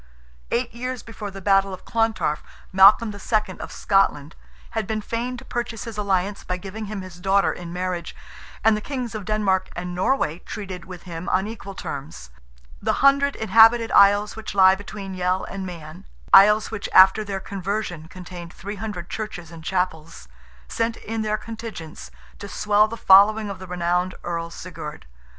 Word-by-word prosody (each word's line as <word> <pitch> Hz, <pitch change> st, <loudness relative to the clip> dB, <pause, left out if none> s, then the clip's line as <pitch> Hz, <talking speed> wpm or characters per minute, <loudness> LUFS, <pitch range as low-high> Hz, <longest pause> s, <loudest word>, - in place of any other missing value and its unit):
Eight 240 Hz, -1 st, -1 dB
years 250 Hz, +1 st, -5 dB
before 220 Hz, -2 st, -7 dB
the 195 Hz, -1 st, -10 dB
battle 195 Hz, -1 st, +3 dB
of 185 Hz, -, -20 dB
Clontarf, 225 Hz, -9 st, 0 dB, 0.3 s
Malcolm 200 Hz, +3 st, +6 dB
II., 205 Hz, -1 st, -2 dB
of -, -, -7 dB
Scotland, 165 Hz, -7 st, +1 dB, 0.4 s
had 220 Hz, -3 st, -2 dB
been 220 Hz, -1 st, -1 dB
feign 235 Hz, +4 st, -3 dB
to 240 Hz, -, -11 dB
purchase 235 Hz, -3 st, -4 dB
his 230 Hz, -2 st, -7 dB
alliance, 200 Hz, -1 st, -1 dB
by 180 Hz, -, -3 dB
giving 200 Hz, +4 st, -7 dB
him 205 Hz, -1 st, -5 dB
his 180 Hz, -1 st, -11 dB
daughter 195 Hz, +2 st, +2 dB
in 175 Hz, -1 st, -8 dB
marriage, 180 Hz, -1 st, -4 dB, 0.5 s
and 220 Hz, -1 st, +5 dB
the 210 Hz, -, -3 dB
Kings 250 Hz, -2 st, -4 dB
of 215 Hz, -3 st, -6 dB
Denmark 205 Hz, -3 st, +1 dB
and 180 Hz, +1 st, -5 dB
Norway 180 Hz, -, 0 dB
treated 185 Hz, -3 st, -7 dB
with 180 Hz, -1 st, -10 dB
him 170 Hz, 0 st, -6 dB
on 190 Hz, +1 st, +1 dB
equal 210 Hz, -3 st, -8 dB
terms. 135 Hz, -, -7 dB, 0.5 s
The -, -, +1 dB
hundred 280 Hz, 0 st, +4 dB
inhabited 225 Hz, +2 st, +5 dB
isles 205 Hz, +1 st, +5 dB
which 220 Hz, -2 st, -7 dB
lie 190 Hz, -1 st, +7 dB
between 195 Hz, 0 st, -7 dB
Yell 185 Hz, 0 st, 0 dB
and 195 Hz, -1 st, -6 dB
Man,—isles 165 Hz, -, +3 dB
which 220 Hz, -2 st, -4 dB
after 190 Hz, +3 st, +7 dB
their 195 Hz, -2 st, -4 dB
conversion 190 Hz, -4 st, -4 dB
contained 175 Hz, -1 st, -9 dB
"three 205 Hz, +2 st, -7 dB
hundred 195 Hz, -4 st, -5 dB
churches 180 Hz, -6 st, -6 dB
and 165 Hz, -1 st, -11 dB
chapels"—sent 155 Hz, -, -4 dB
in 225 Hz, +1 st, -4 dB
their 215 Hz, 0 st, 0 dB
contingents, 220 Hz, -8 st, -8 dB, 0.3 s
to 200 Hz, -, -7 dB
swell 210 Hz, +1 st, +3 dB
the 230 Hz, +1 st, -7 dB
following 205 Hz, +2 st, +5 dB
of 190 Hz, -, -8 dB
the 185 Hz, -, -9 dB
renowned 180 Hz, +1 st, -1 dB
Earl 170 Hz, -1 st, -3 dB
Sigurd. 160 Hz, -, -8 dB
195 Hz, 165 wpm, -23 LUFS, 180-215 Hz, 0.5 s, lie